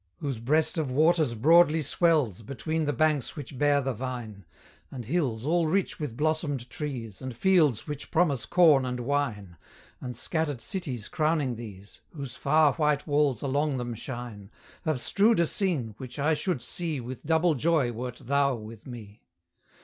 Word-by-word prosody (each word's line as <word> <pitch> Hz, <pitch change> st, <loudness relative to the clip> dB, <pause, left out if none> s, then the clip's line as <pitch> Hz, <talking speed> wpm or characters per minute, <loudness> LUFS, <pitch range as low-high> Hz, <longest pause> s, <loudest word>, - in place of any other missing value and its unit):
Whose 135 Hz, -6 st, -4 dB
breast 155 Hz, +7 st, +1 dB
of 145 Hz, -5 st, -2 dB
waters 155 Hz, -2 st, +3 dB
broadly 160 Hz, +5 st, +5 dB
swells 145 Hz, -, +2 dB
Between 155 Hz, +7 st, -3 dB
the 145 Hz, -, +1 dB
banks 155 Hz, -2 st, +1 dB
which 140 Hz, -3 st, -8 dB
bear 145 Hz, -1 st, +3 dB
the 135 Hz, 0 st, -1 dB
vine, 115 Hz, -5 st, -6 dB, 0.4 s
And 125 Hz, -4 st, -7 dB
hills 130 Hz, -5 st, -1 dB
all 165 Hz, +1 st, +2 dB
rich 190 Hz, +4 st, 0 dB
with 140 Hz, -7 st, -5 dB
blossomed 150 Hz, -5 st, -1 dB
trees, 125 Hz, -9 st, -6 dB
And 130 Hz, -2 st, -6 dB
fields 155 Hz, -, +3 dB
which 145 Hz, -1 st, -6 dB
promise 160 Hz, -8 st, +1 dB
corn 160 Hz, -7 st, +5 dB
and 125 Hz, -1 st, -3 dB
wine, 115 Hz, -, -2 dB, 0.4 s
And 125 Hz, -2 st, -6 dB
scattered 160 Hz, -4 st, -1 dB
cities 130 Hz, -, -3 dB
crowning 150 Hz, -5 st, 0 dB
these, 100 Hz, -4 st, -11 dB
Whose 135 Hz, -4 st, -6 dB
far 145 Hz, +2 st, +3 dB
white 150 Hz, -2 st, +1 dB
walls 145 Hz, -5 st, +1 dB
along 140 Hz, +1 st, 0 dB
them 120 Hz, -1 st, -4 dB
shine, 115 Hz, -4 st, -7 dB, 0.4 s
Have 155 Hz, -5 st, 0 dB
strewed 205 Hz, -, +3 dB
a 170 Hz, -, +4 dB
scene, 160 Hz, -, -1 dB
which 125 Hz, -2 st, -8 dB
I 150 Hz, +3 st, +2 dB
should 155 Hz, -4 st, -2 dB
see 165 Hz, -5 st, -3 dB
With 125 Hz, +1 st, -7 dB
double 160 Hz, +2 st, +2 dB
joy 150 Hz, -3 st, +1 dB
wert 125 Hz, +1 st, -5 dB
THOU 140 Hz, +1 st, +2 dB
with 110 Hz, 0 st, -10 dB
me! 110 Hz, -4 st, -10 dB
140 Hz, 165 wpm, -27 LUFS, 120-155 Hz, 0.4 s, broadly